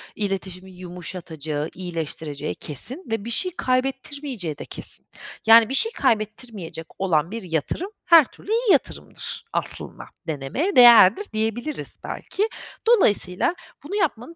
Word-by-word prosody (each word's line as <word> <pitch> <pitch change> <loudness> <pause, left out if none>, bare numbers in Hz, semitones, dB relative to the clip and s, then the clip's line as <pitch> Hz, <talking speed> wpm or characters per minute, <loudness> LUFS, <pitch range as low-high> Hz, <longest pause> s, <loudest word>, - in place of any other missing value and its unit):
İletişimi 190 -2 -4
yumuşatacağı, 170 -4 -5
iyileştireceği 160 -4 -5
kesin 235 - -2
ve 225 -2 -2
bir - - -5
şey 365 +10 +3
kaybettirmeyeceği 260 - -2
de - - -8
kesin. - - -7 0.4
Yani, 225 0 +8
bir - - -3
şey 450 +10 +4
kaybettirmeyecek 215 - -2
olan 170 -2 +1
bir 230 - -5
yatırım, 165 - -2 0.2
her 330 -4 +8
türlü 400 - -11
iyi 455 -2 +2
yatırımdır - - -2
aslında, - - -2 0.2
denemeye 160 - -2
değerdir 240 - +8
diyebiliriz 225 +7 -3
belki. 420 +3 -2 0.4
Dolayısıyla 210 - +3 0.3
bunu 370 +8 -5
yapmanı 330 - -2
215 Hz, 120 wpm, -23 LUFS, 175-280 Hz, 0.4 s, Yani